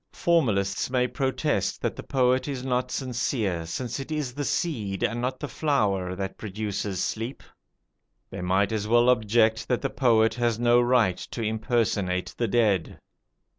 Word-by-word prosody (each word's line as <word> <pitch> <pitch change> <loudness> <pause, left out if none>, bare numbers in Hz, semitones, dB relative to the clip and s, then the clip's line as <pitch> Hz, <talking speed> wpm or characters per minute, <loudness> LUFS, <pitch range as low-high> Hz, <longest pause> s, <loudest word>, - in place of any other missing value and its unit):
Formalists 105 - +1
may 125 -1 +1
protest 135 -4 -1
that - - -1
the - - -6
poet 130 0 +1
is 135 -3 -4
not 125 -1 0
sincere, 115 - -2
since 125 +10 -4
it 135 +3 -7
is 150 -5 -2
the 145 +2 -3
seed 110 - -2
and 120 +1 0
not 130 +1 -2
the 145 - -4
flower 100 - 0
that 95 0 -5
produces 100 -2 -3
sleep. 115 +5 -4 0.9
They - - -6
might 95 +3 +1
as 105 -1 -2
well 120 +2 +4
object 110 -1 +2
that 125 +1 0
the 135 - -1
poet 115 -4 +3
has 120 -1 0
no 120 +1 +4
right 120 -7 +3
to 115 - -6
impersonate 110 -4 0
the 120 - -1
dead. 105 -6 +1
115 Hz, 160 wpm, -26 LUFS, 100-130 Hz, 0.9 s, well